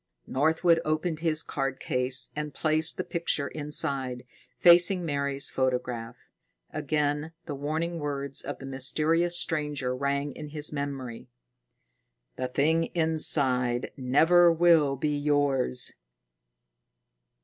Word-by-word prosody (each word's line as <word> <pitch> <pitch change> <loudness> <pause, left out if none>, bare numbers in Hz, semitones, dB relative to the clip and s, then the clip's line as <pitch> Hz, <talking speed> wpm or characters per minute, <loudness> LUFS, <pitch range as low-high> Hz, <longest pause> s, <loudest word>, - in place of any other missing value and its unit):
Northwood 160 +4 +2
opened 155 +1 -1
his 160 -1 +1
card 135 -2 -3
case 125 +1 -1
and 150 -1 -5
placed 155 0 +1
the 185 - -2
picture 165 -5 -1
inside, 135 -4 -2 0.3
facing 175 +1 +5
Mary's 140 -2 -2
photograph. 125 -2 -2 0.5
Again 150 +2 -1
the 150 - -5
warning 160 +4 -3
words 140 -2 -3
of - - -6
the 135 - -10
mysterious 155 +6 +1
stranger 150 -6 -1
rang 140 +2 -1
in 150 +2 -8
his 150 0 -3
memory: 135 -5 -5 1.1
"_The 130 -1 -4
thing 160 +5 +2
inside 135 -7 +2
never 165 +7 +4
will 165 -4 +4
be 150 +2 -1
yours. 145 - 0
145 Hz, 110 wpm, -27 LUFS, 135-160 Hz, 1.1 s, facing